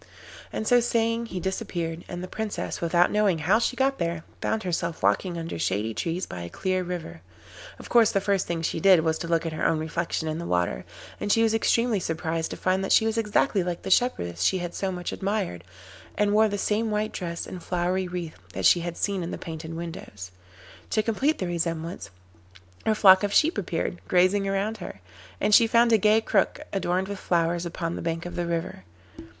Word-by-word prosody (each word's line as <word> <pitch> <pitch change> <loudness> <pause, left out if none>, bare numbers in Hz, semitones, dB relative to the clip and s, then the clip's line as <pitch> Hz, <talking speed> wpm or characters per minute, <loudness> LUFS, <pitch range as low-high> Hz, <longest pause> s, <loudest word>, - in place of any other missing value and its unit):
And 220 - -3
so 245 - +6
saying 230 0 0
he 185 - -5
disappeared, 175 -3 -3
and 175 -1 -5
the - - -5
Princess, 220 +2 -4
without 175 +1 +3
knowing 210 -4 +2
how 180 +8 +3
she 240 - 0
got 270 +1 +1
there, 170 -1 -2 0.2
found 220 0 -1
herself 170 - -2
walking 170 - +1
under 165 - -5
shady 100 +6 -1
trees 170 - -2
by 90 - -7
a 85 - -6
clear 185 - -1
river. 170 - -6 0.6
Of - - -11
course, 230 -3 +5
the 195 - +2
first 195 -1 0
thing 170 -1 -2
she 165 - -1
did 185 -1 +6
was 160 0 0
to 170 - -4
look 165 0 +1
at 165 - -3
her 155 - -4
own 165 - +3
reflection 160 +1 -2
in 155 +1 -2
the 170 - -5
water, 90 -9 0 0.3
and 205 - -1
she 225 - +4
was 225 -1 +2
extremely 230 0 +2
surprised 160 -1 -2
to - - -6
find 185 +1 0
that 195 - -2
she 220 - +5
was 225 0 0
exactly 210 -2 +1
like 175 -1 -4
the 190 - -4
shepherdess 90 - +1
she 185 - +3
had 175 -1 -4
so 195 -1 -2
much 180 -1 -4
admired, 195 - -2 0.5
and 205 0 +2
wore 215 +1 +5
the 205 - -2
same 215 +3 0
white 210 0 -1
dress 170 -2 -4
and 180 - -8
flowery 180 +2 -1
wreath 175 -3 -6
that - - -3
she 175 - +6
had 170 0 -5
seen 200 -2 -1
in 170 - -4
the - - -4
painted 160 -1 -7
windows. 160 - -7 0.6
To 215 - +1
complete 265 +8 +1
the 185 - -2
resemblance, 170 -1 -3 0.8
her 220 - +3
flock 190 -3 +7
of 205 -1 -1
sheep 320 +3 +4
appeared, 175 -2 -3
grazing 185 +2 +3
round 200 +3 -1
her, 175 - -8 0.4
and 210 - +1
she 230 +2 +7
found 235 +1 +4
a 220 - +5
gay 215 +2 +4
crook 205 -3 +1
adorned 185 -1 0
with 200 -1 -5
flowers 170 0 0
upon 170 0 -4
the - - -5
bank 165 0 -3
of 175 - -6
the 175 -1 -2
river. 165 - -3
180 Hz, 210 wpm, -26 LUFS, 165-210 Hz, 0.8 s, flock